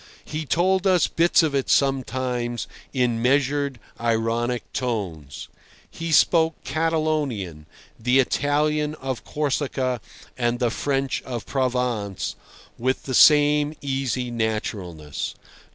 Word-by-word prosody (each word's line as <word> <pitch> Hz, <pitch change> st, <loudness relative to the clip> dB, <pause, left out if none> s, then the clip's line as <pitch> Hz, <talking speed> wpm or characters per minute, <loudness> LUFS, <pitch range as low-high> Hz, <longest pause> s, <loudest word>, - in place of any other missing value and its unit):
He 155 Hz, 0 st, -5 dB
told 185 Hz, +4 st, +2 dB
us 180 Hz, -2 st, +4 dB
bits 170 Hz, 0 st, +3 dB
of 155 Hz, -3 st, 0 dB
it 135 Hz, -2 st, 0 dB
sometimes 125 Hz, -3 st, 0 dB, 0.3 s
in 120 Hz, -3 st, +1 dB
measured, 140 Hz, +1 st, +1 dB, 0.2 s
ironic 115 Hz, +1 st, 0 dB
tones. 90 Hz, -, -4 dB, 0.4 s
He 165 Hz, 0 st, -5 dB
spoke 160 Hz, 0 st, +4 dB
Catalonian, 150 Hz, -, -1 dB, 0.3 s
the 125 Hz, +3 st, +3 dB
Italian 150 Hz, +3 st, +1 dB
of 130 Hz, -4 st, -5 dB
Corsica 135 Hz, -4 st, -1 dB, 0.3 s
and 120 Hz, -1 st, 0 dB
the 120 Hz, -2 st, +1 dB
French 135 Hz, +1 st, -1 dB
of 120 Hz, -3 st, -6 dB
Provençe 125 Hz, -7 st, -1 dB, 0.5 s
with 130 Hz, +2 st, 0 dB
the 130 Hz, -, -4 dB
same 150 Hz, +2 st, +5 dB
easy 135 Hz, -3 st, -2 dB
naturalness. 100 Hz, -9 st, -3 dB
130 Hz, 105 wpm, -24 LUFS, 120-150 Hz, 0.5 s, same